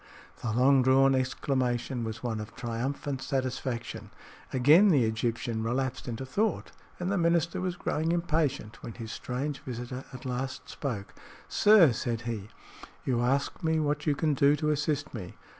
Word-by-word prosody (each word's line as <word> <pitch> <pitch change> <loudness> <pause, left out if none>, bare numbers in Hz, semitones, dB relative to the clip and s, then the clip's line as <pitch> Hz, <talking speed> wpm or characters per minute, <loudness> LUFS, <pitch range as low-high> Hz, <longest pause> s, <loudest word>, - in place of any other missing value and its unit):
The 120 - -2
long 130 +4 +5
drawn 135 +1 +5
exclamation 130 -1 0
was 110 +1 -5
one 115 -3 -2
of 105 +1 -8
triumphant 130 +3 -3
satisfaction. 130 -3 -3 0.4
Again 150 +10 +6
the 145 -9 +4
Egyptian 115 +1 -1
relapsed 130 +4 -2
into 120 +2 -4
thought, 210 +11 -1 0.3
and 180 +2 -1
the 200 - +1
minister 170 0 +2
was 180 -1 -2
growing 160 -1 -1
impatient 155 -9 -1
when 115 - -7
his 115 -1 -7
strange 135 +3 -3
visitor 125 +1 -6
at 130 0 -10
last 130 +1 -4
spoke. 115 -9 -5 0.3
"Sir," 205 -9 +6
said 115 +1 -2
he, 110 -4 -5 0.6
"you 120 -3 +1
ask 135 +3 0
me 160 0 +2
what 150 0 -1
you 145 - +3
can 155 +1 +1
do 140 +1 +4
to 150 0 0
assist 150 0 -1
me. 95 -7 -7
130 Hz, 160 wpm, -29 LUFS, 120-150 Hz, 0.6 s, Again